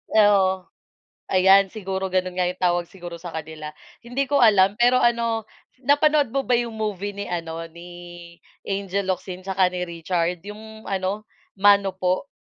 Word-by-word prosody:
Oo, 195 -3 +4 0.7
ayan. 195 +1 +6
Siguro 190 -2 -3
gano'n 185 -1 -1
nga 180 - +2
yung 180 +1 -8
tawag 175 -1 +2
siguro 175 -2 -8
sa 175 0 -8
kanila. 155 -1 -6 0.3
Hindi 245 +4 -1
ko 285 -1 +3
alam 200 -2 +5
pero 245 +1 +5
ano, 230 -2 +1 0.4
napanood 290 -1 +3
mo 275 +1 0
ba 245 - +4
yung 235 -1 -2
movie 205 -2 -3
ni 200 0 -5
ano, 165 -2 -4
ni 170 +2 -12 0.8
Angel 200 0 -2
Locsin 185 0 -4
saka 190 -1 +2
ni 180 0 -3
Richard, 170 +1 -2
yung 220 +1 -10
ano, 195 +2 -2 0.3
Mano 200 0 +5
Po. 185 +8 -1
195 Hz, 155 wpm, -23 LUFS, 180-220 Hz, 0.8 s, ayan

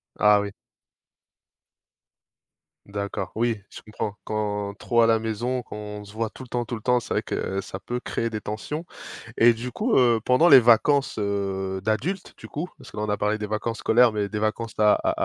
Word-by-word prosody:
Ah 105 -1 +5
oui. 100 0 -3 2.3
D'accord, 100 0 -4
oui. 115 -1 0
Je - - -11
comprends 105 -1 -5
quand 105 -1 -2
trop 120 -1 +2
à 115 - +5
la 115 -1 +4
maison, 115 +3 -2
quand 115 - -10
on 105 0 -7
se 100 - -13
voit 110 0 -2
tout 130 - -11
le - - -12
temps, 120 0 -2
tout 120 +1 -5
le 110 - -8
temps. 125 +2 +2
C'est - - -5
vrai - - +2
que, - - -4
heu, 95 +1 -2
ça - - -7
peut 120 0 -3
créer 115 -1 -2
des 110 -2 -4
tensions 110 +11 -5 0.5
et 120 +1 +6
du 120 +2 -6
coup, 225 - 0
heu, 120 -3 +4
pendant 140 +7 +5
les 135 - +10
vacances, 125 +4 +4
heu, 95 -2 -2
d'adultes, 150 - -2
du - - -11
coup, 155 +5 -4
parce - - -14
que - - -12
là, 105 - -1
on 105 - -2
a 105 - +2
parlé 105 +1 0
des 105 -1 -4
vacances 110 +2 -2
scolaires, 120 +1 +5
mais 105 -1 -1
des 105 +1 -4
vacances 110 +1 -2
à 105 -1 +6
à - - 0
110 Hz, 215 wpm, -25 LUFS, 105-120 Hz, 2.3 s, les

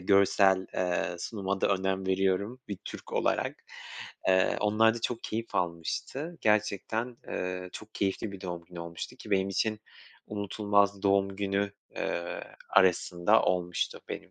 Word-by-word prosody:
görsel, 95 0 +4
eee, 90 -1 0
sunuma 95 +1 -2
da - - +3
önem 95 0 -1
veriyorum 95 +5 +1
bir 100 -3 -4
Türk - - -8
olarak. - - +1 0.7
Eee, 95 0 +4
onlar 110 +2 +4
da 120 - -5
çok 115 0 -2
keyif 115 +1 -3
almıştı 90 - -2
gerçekten, 110 +3 +1
eee, 90 0 -3
çok 110 0 -10
keyifli 100 +1 -1
bir 100 - -8
doğum 85 -2 -5
günü 85 0 -9
olmuştu 85 0 -6
ki - - -11
benim 95 -1 +3
için 110 +2 0 0.5
unutulmaz 100 -1 +1
doğum 100 -1 +3
günü, 100 0 0 0.2
eee, 85 0 -2 0.3
arasında 95 +1 +4
olmuştu, 90 -1 0
benim - - -6
100 Hz, 140 wpm, -30 LUFS, 90-105 Hz, 0.7 s, görsel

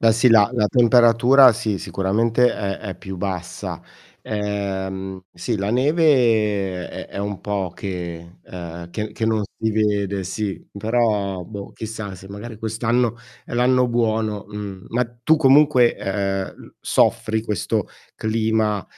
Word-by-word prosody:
Beh, 115 -1 +5
sì, 115 +3 +4
la 110 -2 +6
la 110 -4 +2
temperatura, 120 +2 +6
sì, 105 -3 -2
sicuramente 115 +5 +1
è 100 -1 -3
è 100 -3 -5
più 95 0 -7
bassa. 90 -2 -4 0.4
Ehm, 95 -2 -4
sì, 110 +6 -3
la 100 +2 -2
neve 115 - +2
è - - -7
è - - -8
un 100 -1 -3
po' 100 -4 -2
che 85 -2 -6
ehm, 85 -1 -8
che 105 +3 -4
che 110 - -3
non 110 -1 +1 0.2
si 110 0 0
vede, 100 -2 0
sì. 100 +2 -4
Però, 105 -4 0
boh, 100 -1 -8
chissà 110 -3 -6
se 95 +1 -12
magari 105 +2 -8
quest'anno 115 +1 0 0.3
è 120 - -6
l'anno 125 +1 +3
buono, 110 -3 0
mh. 100 -2 -7
Ma 125 +2 +1 0.2
tu 160 - +5
comunque, 135 -4 +5
eh, 95 -1 -1
l - - -16
soffri 110 0 +1
questo 105 -5 -1 0.3
clima, 110 -2 0
105 Hz, 140 wpm, -21 LUFS, 95-115 Hz, 0.4 s, la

